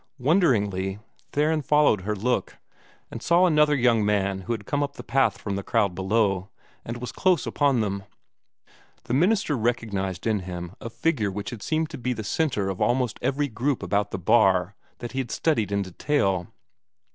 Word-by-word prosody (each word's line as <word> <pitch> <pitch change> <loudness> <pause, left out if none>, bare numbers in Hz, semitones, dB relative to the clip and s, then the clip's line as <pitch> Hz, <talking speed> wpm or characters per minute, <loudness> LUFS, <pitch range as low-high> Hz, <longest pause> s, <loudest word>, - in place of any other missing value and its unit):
Wonderingly, 105 - +1 0.3
Theron 155 +2 +1
followed 150 -8 +3
her 105 +3 -2
look, 125 +5 -1 0.5
and - - -7
saw 175 +2 +4
another 150 -3 +4
young 120 -4 +3
man 100 -2 +1
who 105 - -5
had 105 -3 -6
come 145 +6 -1
up 140 0 -2
the - - -8
path 130 -7 +2
from 100 -1 -4
the 100 - -2
crowd 100 -1 +1
below, 95 0 0 0.3
and 115 +1 -5
was 125 0 -6
close 185 -5 +2
upon 140 -5 +2
them. 100 -2 -3 1.0
The - - -4
minister 180 - +2
recognized 105 -6 -2
in 110 -2 +1
him 90 -1 -6
a 115 - -5
figure 115 -4 0
which 100 +1 -5
had 115 -4 -8
seemed 160 +4 -1
to 145 - -7
be 125 +1 -1
the 110 -2 -5
centre 105 - 0
of 95 -1 -4
almost 125 -2 +1
every 145 +2 0
group 130 +3 -2
about 100 0 0
the - - -4
bar 95 0 +3 0.2
that 120 - -7
he 135 - -3
had 130 -3 -3
studied 115 - 0
in 100 0 +1
detail. 95 -2 0
115 Hz, 180 wpm, -25 LUFS, 100-145 Hz, 1.0 s, saw